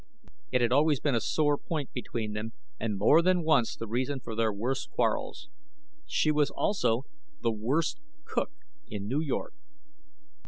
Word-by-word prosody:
It 125 - +3
had 120 0 +2
always 145 +1 +4
been 145 - +1
a 115 - +2
sore 145 +3 +2
point 150 -5 -4
between 115 -3 -3
them, 110 +2 -4 0.3
and 105 -2 -1
more 145 - +6
than 180 0 +3
once 150 -7 +3
the 115 - -5
reason 130 +5 -1
for 115 -3 -7
their 110 -1 +2
worst 120 +6 -2
quarrels. 305 - -1 0.6
She 155 - +2
was 150 -1 +3
also 130 - +1 0.4
the 115 - +3
worst 140 - 0 0.3
cook - - -1 0.4
in 100 -1 -5
New 135 +7 +1
York. 150 -5 -2
130 Hz, 160 wpm, -29 LUFS, 115-155 Hz, 0.6 s, more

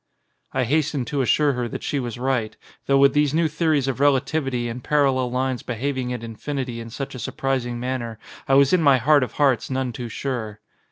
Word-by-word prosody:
I 130 - 0
hastened 145 0 0
to 140 -2 0
assure 145 +3 +3
her 125 -1 -2
that - - -6
she 145 - -1
was 120 -3 -4
right, 125 -3 -1 0.3
though 140 - +4
with 135 0 +5
these 150 0 +2
new 165 0 +3
theories 155 -3 +1
of 135 -1 -2
relativity 135 -2 +1
and 120 +1 -6
parallel 135 -4 +2
lines 130 0 -1
behaving 130 +1 -3
at 120 -2 -4
infinity 125 +2 -4
in 115 0 -7
such 135 +4 -6
a 130 - -7
sur - - -5
prising 125 -3 -1
manner 120 -3 -3 0.3
I 135 - +4
was 140 +2 +5
in 180 - +4
my 140 -4 +5
heart 145 +4 +4
of 125 - -2
hearts 135 -6 +2
none 130 -2 -2
too 120 0 -6
sure. 110 -4 -4
130 Hz, 210 wpm, -23 LUFS, 120-140 Hz, 0.3 s, with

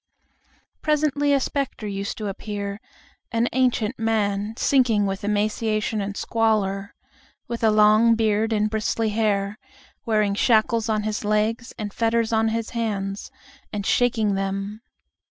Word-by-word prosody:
Presently 295 -1 +1
a 280 - +4
specter 270 -4 -3
used 200 -1 -4
to 215 - -4
appear, 200 0 -5 0.5
an 230 0 +1
ancient 250 -2 +1
man 215 -1 0
sinking 245 -7 +3
with 195 +1 -3
emaciation 215 +1 0
and 200 0 -4
squalor, 205 -3 0 0.5
with 235 -1 -5
a 220 - +5
long 215 +2 +5
beard 220 0 +1
and 210 -1 +2
bristly 220 +1 -1
hair, 210 0 0 0.4
wearing 215 -3 +1
shackles 225 +1 +2
on 215 -1 +1
his 215 0 -2
legs 215 +3 0
and 205 -2 -5
fetters 230 0 +1
on 225 0 +3
his 225 0 -2
hands, 205 -4 -3 0.4
and 205 -1 -4
shaking 225 -4 +2
them. 195 +2 -3
215 Hz, 135 wpm, -23 LUFS, 205-230 Hz, 0.5 s, a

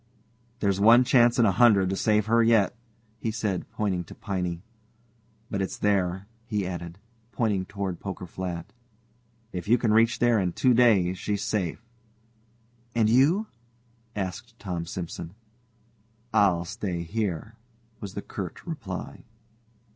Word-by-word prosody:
"There's 100 -2 +1
one 115 +5 +7
chance 120 -3 +4
in 120 - +5
a 100 - +4
hundred 100 -2 +4
to - - 0
save 105 +1 +2
her 115 +1 +3
yet," 115 -1 +3 0.4
he 115 - -2
said, 105 -4 -2
pointing 95 -4 -1
to - - -12
Piney; 90 -4 -3 0.9
"but 100 - -1
it's 95 - -3
there," 95 -2 0 0.2
he 105 -3 -1
added, 85 -1 -6 0.3
pointing 100 -3 0
toward 100 -3 -4
Poker 95 -2 -6
Flat. 90 +1 -6 0.8
"If 90 -1 -5
you 120 +3 +5
can 115 -2 +1
reach 115 +2 +4
there 120 -2 +3
in 90 -3 -1
two 125 +7 +3
days 100 -7 +4
she's 100 -1 -2
safe." 100 0 -2 1.1
"And 110 -2 +3
you?" 150 - +4 0.7
asked 95 -4 -5
Tom 90 -5 -4
Simson. 85 0 -6 1.0
"I'll 90 -4 +3
stay 95 -3 -4
here," 100 0 -3 0.5
was 100 -2 -8
the 100 - -4
curt 95 -5 -7
reply. 130 - -6
100 Hz, 140 wpm, -26 LUFS, 90-115 Hz, 1.1 s, one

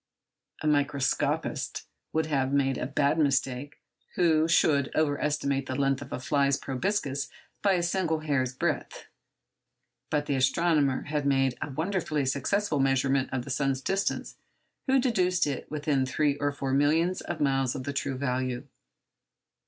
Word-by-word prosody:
A - - 0
microscopist 145 -2 0 0.3
would 160 0 +1
have 135 -4 0
made 135 -2 +1
a - - -2
bad 145 +2 +1
mistake 135 -1 0 0.4
who 160 -3 +3
should 145 -4 +3
over 145 -2 +1
estimate 140 -2 0
the 130 - -3
length 135 0 +1
of - - -9
a - - -3
fly's 140 +2 +2
proboscis 140 -1 -2 0.3
by 200 -2 +3
a 175 -2 +1
single 170 -3 0
hair's 135 -5 0
breadth; - - -2 1.0
but 150 -1 0
the 145 - -1
astronomer 140 0 +2
had 145 -1 -2
made 135 -2 +2
a - - -3
wonderfully 155 -1 -1
successful 150 +6 0
measurement 135 0 +2
of 130 -2 -2
the 140 - -6
sun's 135 0 0
distance 195 +9 -2 0.5
who 265 0 +4
deduced 185 - +2
it 140 -3 -4
within 145 -2 0
three 145 +2 +1
or 145 0 0
four 135 -2 -3
millions 160 +6 +2
of 175 - -5
miles 135 -3 +1
of 130 - -4
the 140 +1 -4
true 135 -1 -2
value. 130 -2 -2
140 Hz, 150 wpm, -28 LUFS, 135-155 Hz, 1.0 s, who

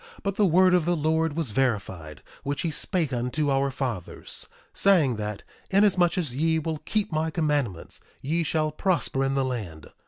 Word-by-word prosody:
But 200 -2 -1
the 205 -1 +4
word 185 +2 +5
of 180 -3 +3
the 175 0 +2
Lord 160 0 +1
was 155 -9 -1
verified, 100 - -2 0.2
which 145 +1 -3
he 165 - 0
spake 155 -2 -1
unto 125 +5 0
our 135 0 +2
fathers, 125 - -5 0.2
saying 160 - +3
that: 105 -1 -4 0.3
Inasmuch 190 -3 +3
as 150 -9 -1
ye 160 +3 +2
will 160 -1 -2
keep 210 +3 -1
my 155 +1 0
commandments 145 - -1 0.2
ye 160 +5 -1
shall 155 -1 0
prosper 155 -5 0
in 135 0 0
the 135 -1 +1
land. 100 -12 -5
150 Hz, 175 wpm, -26 LUFS, 125-170 Hz, 0.3 s, word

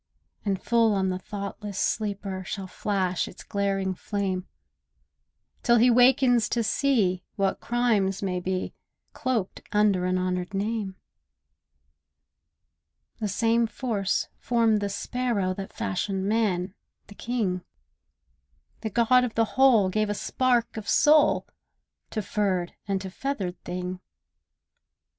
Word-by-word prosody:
And 195 -3 0
full 230 -2 +3
on 190 -1 +1
the 185 0 -2
thoughtless 200 0 -6
sleeper 200 -3 -2
Shall 195 +2 -5
flash 185 -1 -1
its - - -11
glaring 195 -2 -1
flame, 190 -1 -3 1.1
Till 240 - +4
he 245 +2 +5
wakens 245 -2 +5
to 235 - 0
see 215 -6 +1
what 195 -1 0
crimes 220 -6 +1
may 180 -2 -1
be 185 +1 -3 0.4
Cloaked 240 -7 -2
under 205 -3 +3
an 185 0 +1
honoured 185 +1 -2
name. 205 -1 -2 2.2
The 215 - -1
same 230 +3 +2
Force 215 -5 -1
formed 230 -3 +2
the 200 - -1
sparrow 205 -2 -1
That 195 +1 -7
fashioned 190 - -2
man, 200 -4 0 0.3
the 205 - -13
king; 205 -6 -2 1.2
The 220 - -3
God 240 +3 +4
of 245 -3 -3
the 225 - +3
Whole 245 -8 +5
gave 215 +2 0
a 205 - -1
spark 240 0 0
of 210 -2 -5
soul 300 0 +5 0.6
To 215 - -3
furred 190 -4 -1
and 195 -1 0
to 190 -1 -6
feathered 195 -7 -4
thing. 180 +1 -4
205 Hz, 125 wpm, -26 LUFS, 190-230 Hz, 2.2 s, he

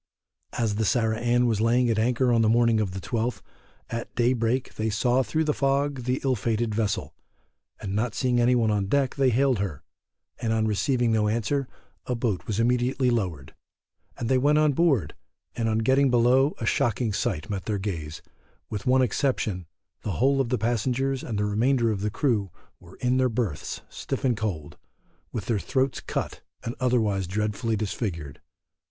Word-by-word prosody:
As 110 -3 0
the 110 - +1
Sarah 110 0 +1
Ann 120 +1 +2
was 110 -3 +1
laying 120 +2 +3
at 110 - 0
anchor 125 +2 +2
on 115 - +4
the 110 - +3
morning 115 -1 +3
of 105 -3 0
the 95 - -4
12th, 115 +4 -2 0.5
at 115 0 -5
day 120 +1 +3
break 120 +2 -1
they 110 +1 -2
saw 125 +4 +2
through 160 +4 0
the 150 -1 +1
fog 140 -2 0
the 125 +1 0
ill 135 -1 +2
fated 115 0 -1
vessel, 105 -2 -1 0.7
and 95 - -5
not 110 +2 -1
seeing 125 -2 +1
any 125 +1 +4
one 115 -3 +2
on 100 -2 0
deck 135 +3 +1
they 135 -2 +2
hailed 130 -1 +2
her, 90 -8 -4 0.6
and 115 -1 0
on 110 -1 +1
receiving 120 +2 +1
no 110 -1 +2
answer 120 +5 0 0.4
a 125 - 0
boat 115 -6 -2
was 110 -1 -1
immediately 125 +2 +2
lowered, 90 - -2 0.6
and 120 - -3
they 130 +1 +3
went 145 +3 +3
on 155 -1 +4
board, 140 - +2 0.4
and 115 -1 0
on 110 - +1
getting 130 +5 +3
below 125 +4 +3
a 115 - -4
shocking 115 -1 +1
sight 100 -5 -2
met 100 -3 -4
their 105 -2 -1
gaze, 80 -6 -5 0.5
with 105 0 -4
one 130 +1 +4
exception 110 - -1 0.3
the 105 - -3
whole 135 - +2
of 125 - -2
the 125 - +1
passengers 125 +4 0
and 110 - -3
the 105 - +1
remainder 115 +3 +2
of 100 -3 -3
the 105 - 0
crew 110 -4 0 0.3
were - - -15
in 125 +1 +2
their 130 -1 +3
berths 110 - -3
stiff - - -4
and 125 -2 +3
cold, 100 -9 -4 0.5
with 110 -4 -4
their 115 -4 0
throats 130 +4 0
cut, - - -4 0.2
and 115 - -3
otherwise 110 -7 +1
dreadfully 105 +4 -1
disfigured. 95 - -4
115 Hz, 185 wpm, -26 LUFS, 105-130 Hz, 0.7 s, on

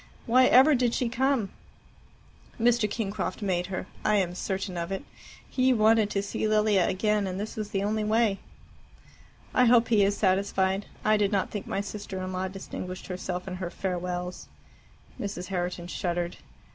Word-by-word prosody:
Why 255 +2 +5
ever 270 +5 +7
did 245 -3 +2
she 245 - 0
come?" 260 -4 +1 1.1
"Mr. 235 -2 +3
Kingcroft 205 -2 -3
made 180 -3 0
her. 190 -1 -4 0.2
I 210 - +3
am 185 -3 +1
certain 190 +1 -3
of 170 +1 -3
it. 195 - -3 0.4
He 255 0 +2
wanted 220 -1 +4
to 200 -1 -1
see 200 +2 -2
Lilia 210 -3 +3
again, 210 +1 +1
and 185 0 -4
this 210 +2 -5
was 215 -1 -4
the 195 0 -1
only 215 +1 0
way." 215 -2 +2 1.1
"I 250 - +5
hope 235 -1 +5
he 215 -3 +5
is 200 +1 +1
satisfied. 190 0 +1 0.2
I 215 0 +4
did 205 -1 +1
not 195 -2 0
think 205 - -5
my 195 - -1
sister 200 -1 -6
in 185 0 -4
law 185 +1 -1
distinguished 185 -1 -7
herself 180 0 -4
in 185 -1 -4
her 180 -2 -4
farewells." 180 -1 -4 0.7
Mrs. 200 -3 -5
Herriton 175 -2 -2
shuddered. 175 -1 -2
200 Hz, 170 wpm, -27 LUFS, 185-215 Hz, 1.1 s, ever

